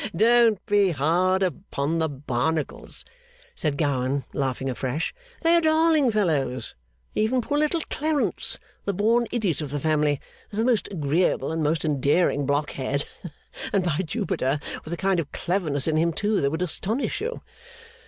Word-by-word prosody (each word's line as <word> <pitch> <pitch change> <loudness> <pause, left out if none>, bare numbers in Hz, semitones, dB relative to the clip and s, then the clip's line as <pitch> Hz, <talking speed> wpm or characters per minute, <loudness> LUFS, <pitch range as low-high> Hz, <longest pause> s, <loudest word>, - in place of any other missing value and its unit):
Don't 230 +1 +4
be 205 -2 +3
hard 175 +5 +2
upon 165 -4 -2
the 160 -1 +1
Barnacles,' 145 +3 -2 0.5
said 150 -3 0
Gowan, 140 -2 0
laughing 135 -1 -1
afresh, 130 +3 -2 0.3
'they 335 +1 +5
are - - +3
darling 315 -3 +4
fellows! 150 - 0 0.4
Even 220 +4 +1
poor 290 +5 0
little 305 +2 +1
Clarence, 290 - 0 0.3
the 200 - -1
born 230 +4 +2
idiot 195 - 0
of 150 - -4
the 145 +1 -2
family, 150 -2 +1 0.3
is 205 - -7
the 225 - +2
most 245 -4 +2
agreeable 160 0 +1
and 160 0 -1
most 155 +2 +1
endearing 145 0 +2
blockhead! 140 -1 -1 0.7
And 195 - +2
by 170 -4 0
Jupiter, 145 -4 -1 0.2
with 155 - -8
a 170 - -2
kind 190 -1 +1
of 150 -4 -4
cleverness 165 -7 -1
in 155 -1 +2
him 165 +1 +2
too 210 +4 0
that 140 - +2
would 160 +5 -2
astonish 220 - -1
you! 475 +3 -4
165 Hz, 155 wpm, -25 LUFS, 145-215 Hz, 0.7 s, they